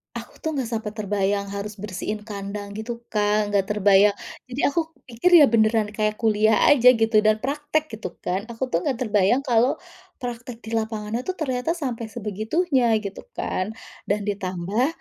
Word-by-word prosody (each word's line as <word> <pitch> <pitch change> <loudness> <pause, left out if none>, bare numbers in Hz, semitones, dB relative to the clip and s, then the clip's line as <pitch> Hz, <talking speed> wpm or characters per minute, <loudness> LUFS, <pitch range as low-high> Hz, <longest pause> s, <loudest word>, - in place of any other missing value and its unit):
Aku - - -8
tuh 315 -1 -3
enggak 255 -4 -2
sampai 220 -2 -3
terbayang 200 -1 -1
harus 200 +1 -5
bersihin 205 +1 -5
kandang 200 -1 -6
gitu 235 +1 -5
Kak, 210 0 +1
enggak 200 -2 +1
terbayang. 205 0 +4 0.3
Jadi 250 +2 -5
aku 325 +2 0 0.2
pikir 320 +8 +6
ya - - +9
beneran 220 -1 +3
kayak 215 0 0
kuliah 215 +1 +4
aja 250 -3 +7
gitu 225 -1 +3
dan 215 +1 +3
praktek 295 +3 -1
gitu 185 -5 -6
kan. 190 +4 -2
Aku 240 +2 -4
tuh 165 - +2
enggak 270 - +1
terbayang 215 +3 +2
kalau 245 -1 +3 0.5
praktek 240 -1 -6
di 220 - -9
lapangannya 220 +2 -4
tuh 370 - -2
ternyata 275 0 -1
sampai 250 -9 -4
sebegitunya 230 - 0
gitu 200 - -7
kan. 195 +4 -3 0.3
Dan 205 +1 0
ditambah 200 +3 -1
220 Hz, 165 wpm, -23 LUFS, 205-250 Hz, 0.5 s, ya